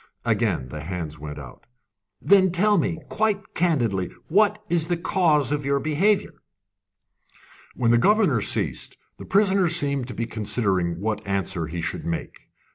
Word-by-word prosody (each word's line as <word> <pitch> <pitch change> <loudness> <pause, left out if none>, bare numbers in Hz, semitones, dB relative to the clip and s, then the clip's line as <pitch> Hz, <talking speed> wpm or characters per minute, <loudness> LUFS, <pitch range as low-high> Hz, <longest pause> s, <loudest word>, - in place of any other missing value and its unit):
Again 105 - 0
the 75 +2 -7
hands 80 -2 -6
went 75 0 -7
out. 65 -4 -12 0.5
"Then 190 -2 +4
tell 205 +3 +3
me, 165 0 -1
quite 210 -2 -1
candidly, 120 - 0 0.2
what 210 +4 +3
is 170 -3 +1
the 175 - 0
cause 165 - +1
of 145 0 -1
your 140 0 +1
behaviour?" 165 +6 +2 1.4
When 115 -2 +2
the 120 - +4
governor 195 - +3
ceased, - - -3 0.2
the - - -8
prisoner 195 -2 +3
seemed 140 -6 0
to 125 - -8
be 115 - -2
considering 100 -6 -1
what 110 +2 -2
answer 95 -4 -2
he 85 +2 -5
should - - -4
make. 85 -1 -5
140 Hz, 150 wpm, -24 LUFS, -, 1.4 s, Then